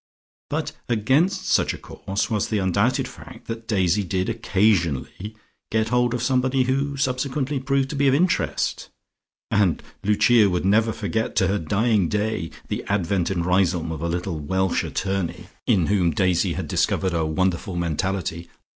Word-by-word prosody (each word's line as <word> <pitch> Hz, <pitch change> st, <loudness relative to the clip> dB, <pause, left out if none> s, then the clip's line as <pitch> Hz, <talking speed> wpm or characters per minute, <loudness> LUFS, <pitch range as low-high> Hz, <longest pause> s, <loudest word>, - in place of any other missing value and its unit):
But -, -, -2 dB, 0.2 s
against 140 Hz, -, +2 dB
such -, -, +2 dB
a -, -, -9 dB
course 100 Hz, +1 st, -4 dB
was 105 Hz, -3 st, 0 dB
the 110 Hz, -, -1 dB
undoubted 100 Hz, +5 st, +1 dB
fact -, -, -12 dB
that 115 Hz, 0 st, -6 dB
Daisy 95 Hz, -3 st, +2 dB
did 95 Hz, +2 st, -1 dB
occasionally 100 Hz, -, 0 dB, 0.4 s
get 110 Hz, 0 st, +1 dB
hold 125 Hz, 0 st, +2 dB
of 120 Hz, -, -3 dB
somebody 130 Hz, 0 st, +2 dB
who 135 Hz, +2 st, -1 dB
subsequently 135 Hz, +1 st, -1 dB
proved 135 Hz, 0 st, 0 dB
to -, -, -4 dB
be 140 Hz, 0 st, +2 dB
of 135 Hz, -, +4 dB
interest, 175 Hz, +4 st, 0 dB, 0.6 s
and 100 Hz, -6 st, +2 dB, 0.2 s
Lucia 105 Hz, +1 st, +4 dB
would 90 Hz, 0 st, -1 dB
never 110 Hz, +3 st, +3 dB
forget 110 Hz, 0 st, -2 dB
to -, -, +3 dB
her 100 Hz, +1 st, +1 dB
dying 100 Hz, +2 st, +1 dB
day 105 Hz, -5 st, -1 dB, 0.2 s
the -, -, -3 dB
advent 95 Hz, -2 st, 0 dB
in 90 Hz, -3 st, -1 dB
Riseholme 90 Hz, -2 st, +1 dB
of 80 Hz, -2 st, -5 dB
a 85 Hz, -, -1 dB
little 85 Hz, -1 st, -3 dB
Welsh 95 Hz, +5 st, 0 dB
attorney, 95 Hz, -3 st, -3 dB, 0.2 s
in 90 Hz, -5 st, +3 dB
whom 95 Hz, -3 st, +2 dB
Daisy 90 Hz, +1 st, +1 dB
had -, -, -4 dB
discovered 95 Hz, -2 st, 0 dB
a 80 Hz, -1 st, +1 dB
wonderful 90 Hz, +3 st, -1 dB
mentality. 85 Hz, 0 st, -2 dB
100 Hz, 160 wpm, -23 LUFS, 90-120 Hz, 0.6 s, of